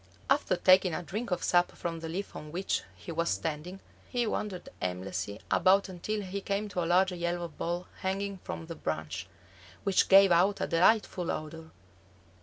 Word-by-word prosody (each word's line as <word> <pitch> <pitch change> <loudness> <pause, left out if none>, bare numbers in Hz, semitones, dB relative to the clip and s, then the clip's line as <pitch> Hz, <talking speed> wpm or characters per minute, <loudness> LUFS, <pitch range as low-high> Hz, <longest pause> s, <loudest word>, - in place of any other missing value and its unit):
After - - +3
taking 185 -2 +5
a 180 - -4
drink 215 +7 -4
of 180 -2 -1
sap 175 0 +3
from 165 -2 -4
the 160 0 -6
leaf 190 +5 -5
on 150 0 -8
which 185 +4 -1
he - - -9
was 170 +1 0
standing, 150 - -3 0.3
he 245 -1 0
wandered 210 -4 -3
aimlessly 90 +2 -3
about 195 +1 +4
until 205 +4 -3
he 195 +1 -4
came 200 +2 -1
to 180 -3 -1
a - - -2
large 185 +2 +4
yellow 175 0 -2
ball 175 +3 -3
hanging 195 +1 -2
from 85 - -6
the - - -6
branch, 80 +4 -4 0.6
which 195 -2 +3
gave 195 -1 +8
out 185 +4 +4
a - - 0
delightful 180 0 +2
odor. 160 +1 -5
175 Hz, 175 wpm, -30 LUFS, 160-195 Hz, 0.6 s, gave